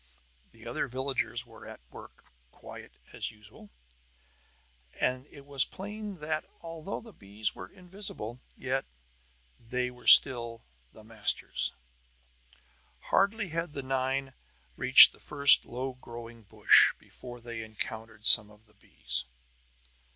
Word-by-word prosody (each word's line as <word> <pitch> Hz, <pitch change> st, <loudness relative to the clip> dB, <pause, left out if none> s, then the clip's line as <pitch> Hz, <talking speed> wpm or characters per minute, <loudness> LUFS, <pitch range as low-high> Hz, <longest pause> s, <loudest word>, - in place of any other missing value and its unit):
The -, -, -18 dB
other -, -, -4 dB
villagers 130 Hz, -1 st, -4 dB
were 115 Hz, -2 st, -15 dB
at -, -, -12 dB
work -, -, -15 dB, 0.2 s
quite -, -, -14 dB, 0.2 s
as -, -, -6 dB
usual; 105 Hz, -1 st, -17 dB, 1.3 s
so 130 Hz, +1 st, -2 dB
it 140 Hz, -2 st, -16 dB
was 140 Hz, -2 st, 0 dB
plain 205 Hz, 0 st, -9 dB
that, 155 Hz, 0 st, -4 dB, 0.2 s
although 165 Hz, +3 st, -8 dB
the 225 Hz, -2 st, -16 dB
bees 100 Hz, +2 st, -5 dB
were 90 Hz, -, -11 dB
invisible, 180 Hz, -, -9 dB, 0.2 s
yet 130 Hz, +1 st, -3 dB, 0.7 s
they 125 Hz, +1 st, -4 dB
were 125 Hz, 0 st, -16 dB
still 120 Hz, -4 st, +7 dB, 0.3 s
the 110 Hz, -, -17 dB
masters. 110 Hz, -1 st, -3 dB, 1.4 s
Hardly 200 Hz, 0 st, +1 dB
had 165 Hz, -1 st, -5 dB
the 140 Hz, -, -7 dB
nine 135 Hz, 0 st, -3 dB, 0.4 s
reached -, -, +8 dB
the -, -, -21 dB
first 140 Hz, -1 st, +3 dB
low 130 Hz, +2 st, -6 dB
growing 120 Hz, -2 st, -12 dB
brush -, -, +4 dB
before 120 Hz, -1 st, -13 dB
they 120 Hz, -1 st, -8 dB
encountered 110 Hz, 0 st, -9 dB
some 110 Hz, -3 st, +9 dB
of 105 Hz, +1 st, -22 dB
the 105 Hz, -, -29 dB
bees. 65 Hz, -9 st, -5 dB
125 Hz, 125 wpm, -28 LUFS, 110-145 Hz, 1.4 s, some